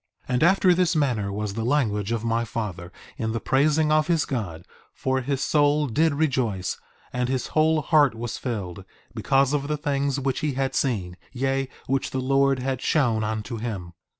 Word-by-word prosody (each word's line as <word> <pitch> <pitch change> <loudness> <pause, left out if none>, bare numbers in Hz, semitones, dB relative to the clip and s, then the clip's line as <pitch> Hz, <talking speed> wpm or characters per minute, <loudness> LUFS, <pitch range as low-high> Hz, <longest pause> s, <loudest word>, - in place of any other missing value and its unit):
1:15 125 - -3
And 125 - +2
after 185 +1 +5
this 175 -1 +2
manner 120 -10 0
was 105 0 -3
the 115 +2 -3
language 115 -6 0
of 115 -1 -1
my 115 0 0
father 105 -7 -5 0.3
in 110 -2 -1
the 115 - -1
praising 150 +5 +2
of 155 0 +3
his 165 -3 +2
God; 90 -11 -4 0.3
for 130 0 0
his 135 +1 -2
soul 150 0 +3
did 145 +4 +1
rejoice, 125 -11 -1 0.3
and 125 0 -1
his 130 -2 -1
whole 155 0 +3
heart 145 -5 +4
was 115 +1 -5
filled, 100 -7 -4 0.3
because 135 +4 +2
of 140 -1 0
the 150 0 -1
things 140 -1 -1
which 135 -1 -1
he 150 -2 -1
had 135 0 -1
seen, 95 -10 -1
yea, 135 +1 -1 0.2
which 135 +1 -1
the 130 - -3
Lord 135 +1 +2
had 130 0 -2
shown 120 -8 +2
unto 110 +2 -3
him. 100 -7 -5
130 Hz, 185 wpm, -24 LUFS, 110-145 Hz, 0.3 s, after